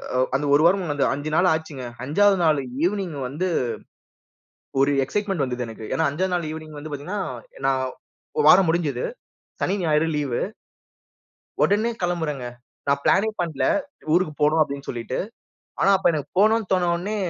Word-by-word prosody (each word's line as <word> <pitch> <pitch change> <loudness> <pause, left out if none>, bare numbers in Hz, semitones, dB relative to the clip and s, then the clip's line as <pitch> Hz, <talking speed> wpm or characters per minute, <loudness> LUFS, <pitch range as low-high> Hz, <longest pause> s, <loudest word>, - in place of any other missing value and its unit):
அ - - +2 0.2
அந்த 145 +2 0
1 145 - +6
வாரமும் 180 -3 +3
அந்த 145 - 0
5 145 +2 -4
நாள் 180 +1 +4
ஆச்சுங்க. 155 -5 -5 0.2
5வது 195 +8 +3
நாள் 155 -3 +4 0.2
ஈவினிங் 180 -4 -1
வந்து. 165 +7 -2 1.3
ஒரு 140 +1 +4
எக்சைட்மன்ட் 195 +1 -1
வந்துது 125 -1 -2
எனக்கு. 110 -1 -8
ஏன்னா 160 - +1
5வது 180 +5 -1
நாள் 175 -3 -1 0.3
வந்து 155 +1 -8
பாத்தீங்கன்னா 150 +9 -4 0.5
நான் 135 -1 +2 0.5
1 - - +3
வாரம் 185 0 +7
முடிஞ்சுது. 155 -7 0 0.6
சனி, 195 - +1
ஞாயிறு 155 0 +2
லீவு. 140 -5 -1 1.2
ஒடனே 215 +3 +2
கெளம்புரங்க. 160 -7 -1 0.4
நான் 140 0 +2
பிளனே 210 +3 +3
பண்ல 165 -5 -2 0.5
ஊருக்கு 175 -3 +2
போணு 155 +2 +4
அப்டின்னு 140 -2 -2
சொல்லிட்டு. 120 +1 -4 0.6
ஆனா, 195 - +4
அப்ப 190 - +1
எனக்கு 150 -3 -3
போணும்னு 220 0 +3
தோண்ண 180 -2 +3
உடனே 200 +5 -3
160 Hz, 150 wpm, -23 LUFS, 140-185 Hz, 1.3 s, வாரம்